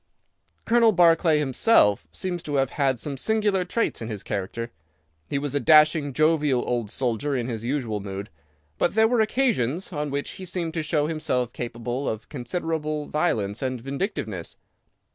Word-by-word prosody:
"Colonel 230 Hz, -1 st, +4 dB
Barclay 165 Hz, -3 st, +5 dB
himself 130 Hz, -, +3 dB
seems 175 Hz, -, -3 dB
to 145 Hz, -2 st, -4 dB
have 135 Hz, -1 st, +1 dB
had 135 Hz, -4 st, +1 dB
some 140 Hz, +3 st, -3 dB
singular 210 Hz, +1 st, +1 dB
traits 205 Hz, -, -1 dB
in 115 Hz, -, -4 dB
his 105 Hz, -3 st, -5 dB
character. 110 Hz, +4 st, -4 dB, 0.6 s
He -, -, -1 dB
was 140 Hz, -1 st, -2 dB
a 145 Hz, -, +1 dB
dashing, 155 Hz, +1 st, +5 dB
jovial 150 Hz, -3 st, +2 dB
old 120 Hz, -4 st, -1 dB
soldier 130 Hz, +4 st, -1 dB
in 120 Hz, -2 st, -1 dB
his 115 Hz, -3 st, -4 dB
usual 120 Hz, -4 st, -2 dB
mood, 100 Hz, 0 st, -6 dB, 0.5 s
but 175 Hz, -, +1 dB
there 220 Hz, 0 st, +5 dB
were 235 Hz, -1 st, +2 dB
occasions 195 Hz, -, 0 dB
on 150 Hz, -1 st, -2 dB
which 140 Hz, +1 st, -3 dB
he 185 Hz, -, -9 dB
seemed 175 Hz, -2 st, -3 dB
to 165 Hz, -, -1 dB
show 150 Hz, -1 st, 0 dB
himself 150 Hz, -6 st, -1 dB
capable 120 Hz, +2 st, -3 dB
of 110 Hz, 0 st, -5 dB
considerable 155 Hz, +2 st, -3 dB
violence 110 Hz, -, 0 dB
and 130 Hz, -2 st, -2 dB
vindictiveness. 130 Hz, -, -4 dB
145 Hz, 160 wpm, -25 LUFS, 120-165 Hz, 0.6 s, Barclay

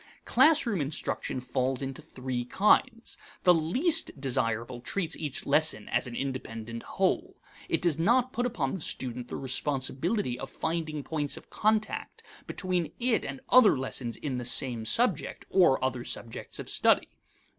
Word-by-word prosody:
Classroom 290 Hz, -, +4 dB
instruction 140 Hz, -2 st, -2 dB
falls 130 Hz, +1 st, -1 dB
into 135 Hz, +3 st, -5 dB
three 130 Hz, -5 st, -4 dB
kinds. 225 Hz, -, +2 dB, 0.2 s
The 180 Hz, -, +7 dB
least 250 Hz, -, +2 dB
desirable 120 Hz, -2 st, -1 dB
treats 175 Hz, +5 st, -1 dB
each 150 Hz, -4 st, -4 dB
lesson 145 Hz, -7 st, +1 dB
as -, -, 0 dB
an 120 Hz, -, -7 dB
independent 115 Hz, -4 st, -5 dB
whole. -, -, -1 dB, 0.3 s
It -, -, 0 dB
does 165 Hz, -3 st, +2 dB
not 245 Hz, +8 st, +3 dB
put 245 Hz, +1 st, 0 dB
upon 135 Hz, -, -2 dB
the 190 Hz, -, -4 dB
student 125 Hz, -3 st, -4 dB
the -, -, -6 dB
responsibility 135 Hz, -, -1 dB
of 135 Hz, -, -6 dB
finding 155 Hz, -2 st, -3 dB
points 150 Hz, -2 st, -2 dB
of -, -, -14 dB
contact 215 Hz, 0 st, -1 dB, 0.2 s
between 180 Hz, -3 st, -2 dB
it 240 Hz, -2 st, +2 dB
and 135 Hz, -1 st, -5 dB
other 245 Hz, -, +7 dB
lessons 130 Hz, -2 st, -4 dB
in 135 Hz, -4 st, -3 dB
the -, -, -4 dB
same 120 Hz, -2 st, +2 dB
subject, 185 Hz, -, +1 dB
or 175 Hz, -8 st, +5 dB
other 125 Hz, -2 st, -2 dB
subjects 115 Hz, -1 st, -5 dB
of -, -, -6 dB
study. -, -, +3 dB
145 Hz, 150 wpm, -29 LUFS, 125-190 Hz, 0.3 s, The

